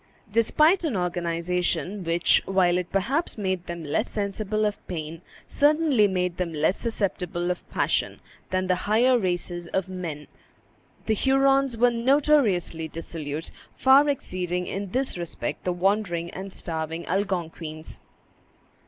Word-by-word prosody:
Despite 305 - +4
an 285 - 0
organization 180 +2 -1
which, 170 +1 +3
while 180 -2 +3
it 180 - -6
perhaps 260 - 0
made 185 -3 -2
them 170 -1 -5
less 155 - -1
sensible 210 +1 -1
of 210 0 -2
pain, 160 -1 -5 0.3
certainly 290 -7 +3
made 180 -2 -1
them 180 -2 -2
less 155 +5 +2
susceptible 180 -6 -2
of 180 - -6
passion, - - 0 0.3
than 185 0 0
the 185 - +2 0.2
higher 245 +3 +4
races 175 -2 -2
of 190 +2 -2
men, 165 -5 -5 0.8
the 220 - +2
Hurons 270 +1 +3
were 245 +1 +4
notoriously 235 - +2
dissolute, 160 -1 -6 0.2
far 275 +2 +5
exceeding 180 -9 -2
in 195 +1 -4
this 255 -3 -1
respect 165 -8 -4
the 180 - +1
wandering 175 -2 0
and 190 +1 -7
starving 165 -1 -4
Algonquins. 165 -4 -3
185 Hz, 130 wpm, -25 LUFS, 170-225 Hz, 0.8 s, far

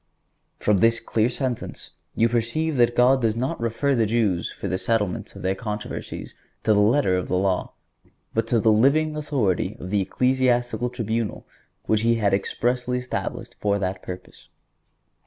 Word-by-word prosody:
(135) - - -16
From 105 -2 +4
this 115 0 +4
clear 115 0 +1
sentence 125 -2 -4 0.2
you 115 - +4
perceive 120 +7 0
that 120 0 +3
God 130 +2 +5
does 110 -2 +1
not 130 +4 -2
refer 115 +5 0
the 115 -4 +2
Jews 105 -6 0
for - - -6
the 95 - -1
settlement 105 -5 -1
of - - -9
their 95 +1 +1
controversies 105 +1 -6 0.3
to 110 - +4
the 105 - +3
letter 105 -2 +3
of 90 - -2
the - - 0
law, 95 -1 0 0.6
but 115 0 0
to 115 0 +2
the 110 +1 +4
living 145 +8 +3
authority 140 - -1
of 90 - -7
the 105 -1 +2
ecclesiastical 125 +1 +1
tribunal 115 -2 -3 0.4
which 110 -1 +2
He 115 +1 +3
had 105 -3 +1
expressly 125 +5 0
established 125 0 -4
for 100 -1 +1
that 95 -1 -3
purpose. 90 0 -10
115 Hz, 170 wpm, -24 LUFS, 105-125 Hz, 0.6 s, God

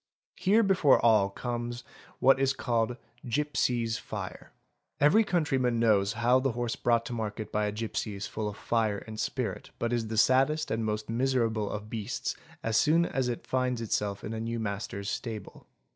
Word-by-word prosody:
Here 210 +4 +4
before 185 -8 +4
all 105 -4 +5
comes 120 +2 -4 0.3
what 135 +1 +5
is 135 0 +2
called 120 -2 0 0.2
" - - -32
gipsies' 120 -5 0
fire'. - - -7 0.5
Every 150 +10 +5
countryman 135 - +1
knows 105 -3 +3
how 120 +3 +3
the 130 -2 0
horse 120 0 -2
brought 115 -1 +1
to 125 - -5
market 110 -1 -4
by 105 0 +1
a - - -1
gipsy 105 -1 -3
is 100 - -4
full 110 -1 -3
of 100 - -9
fire 110 -3 0
and 110 -1 -8
spirit. - - -3
but 115 0 -1
is 115 -2 0
the 110 0 -4
saddest 135 +7 +3
and 110 0 0
most 105 0 -2
miserable 115 -3 0
of 105 0 -5
beasts 110 -2 -3 0.3
as 110 -1 +1
soon 165 +3 +4
as 130 -5 -1
it 120 - -4
finds 130 -2 0
itself 105 -3 -2
in 110 - -4
a 110 - -3
new 115 +1 -3
master's 100 -1 -4
stable. 110 -3 -5
115 Hz, 180 wpm, -29 LUFS, 110-130 Hz, 0.5 s, all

